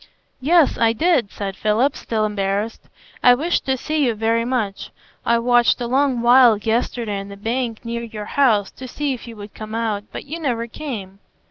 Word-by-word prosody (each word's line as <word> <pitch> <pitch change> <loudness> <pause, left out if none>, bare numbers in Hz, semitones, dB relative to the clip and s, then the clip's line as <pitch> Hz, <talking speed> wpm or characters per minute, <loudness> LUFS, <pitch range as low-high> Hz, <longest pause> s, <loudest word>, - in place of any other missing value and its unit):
"Yes, 320 +2 +3
I 230 -1 +3
did," 275 - +1
said 195 -2 -5
Philip, 225 +8 +1
still 220 -2 -1
embarrassed; 205 +1 -2 0.3
"I 245 0 +7
wished 325 +5 -1
to 265 0 +1
see 305 +3 -1
you 235 - 0
very 225 +2 +1
much. 230 -6 -2 0.4
I 235 - +4
watched 240 0 +3
a 240 - -2
long 260 0 +1
while 240 -2 +6
yesterday 225 -1 -1
on 195 - -7
the 200 0 -10
bank 230 +2 -3
near 235 0 -3
your 220 -3 -7
house 220 -6 +2
to 260 - -9
see 285 +2 -2
if 250 - -9
you 230 - -9
would 205 -1 -10
come 215 0 -7
out, 215 -3 -2
but - - -7
you 315 +4 -6
never 240 -7 -1
came. 220 -7 -7
230 Hz, 195 wpm, -21 LUFS, 215-255 Hz, 0.4 s, I